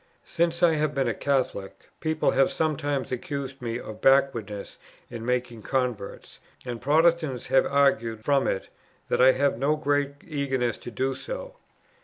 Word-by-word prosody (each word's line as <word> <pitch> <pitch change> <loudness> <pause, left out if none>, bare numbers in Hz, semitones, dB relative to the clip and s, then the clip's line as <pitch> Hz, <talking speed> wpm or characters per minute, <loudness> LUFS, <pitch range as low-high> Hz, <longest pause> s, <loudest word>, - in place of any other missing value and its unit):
Since 170 +1 0
I 170 -2 +6
have 150 -1 0
been 135 -2 +1
a 115 - +1
Catholic, 130 -7 -2
people 155 -1 +1
have 135 0 +3
sometimes 145 -5 -1
accused 135 +1 -4
me 115 -1 -3
of 110 -3 -9
backwardness 115 -7 +1 0.3
in 115 -2 -6
making 125 -1 -2
converts; 125 -5 -3 0.3
and 120 -2 -5
Protestants 155 -2 +2
have 135 - +4
argued 115 -6 +2
from 140 -1 +3
it 95 - -2 0.4
that - - +2
I 130 +1 +7
have 140 -3 +1
no 145 +3 +2
great 145 -1 0
eagerness 135 - -1
to - - -8
do 130 +4 -1
so. - - -7
135 Hz, 155 wpm, -26 LUFS, 120-145 Hz, 0.4 s, I